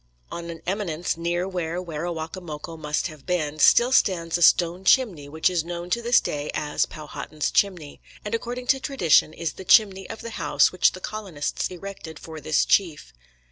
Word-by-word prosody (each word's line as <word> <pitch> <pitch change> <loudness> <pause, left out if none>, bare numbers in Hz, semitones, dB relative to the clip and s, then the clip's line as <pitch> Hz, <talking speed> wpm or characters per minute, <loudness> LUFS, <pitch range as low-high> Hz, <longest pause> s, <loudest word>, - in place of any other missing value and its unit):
On 170 0 -6
an 165 -1 -8
eminence 180 -3 -2
near 175 +2 -2
where 175 -2 -3
Werowocomoco 165 -1 -6
must 150 -1 -2
have 155 -5 -8
been, 155 -4 -1
still 240 +10 +6
stands 170 -9 +2
a 175 - -1
stone 175 +2 +4
chimney 190 - +2
which 160 +2 +1
is 180 -3 +1
known 175 +1 -6
to 235 - +1
this 240 +1 +4
day 145 0 -4
as 150 -1 0
"Powhatan's 150 0 -5
Chimney," 175 -8 0 0.2
and 210 - -4
according 245 +2 -3
to 270 - -7
tradition 260 - +3
is 160 -1 -4
the - - -10
chimney 195 -1 +4
of 225 - -7
the 230 - -7
house 145 -1 +3
which 185 - +3
the 185 - -9
colonists 190 -10 -3
erected 180 -3 -9
for 160 -1 -9
this 155 +1 +1
chief. 170 - +1
170 Hz, 180 wpm, -24 LUFS, 155-190 Hz, 0.2 s, still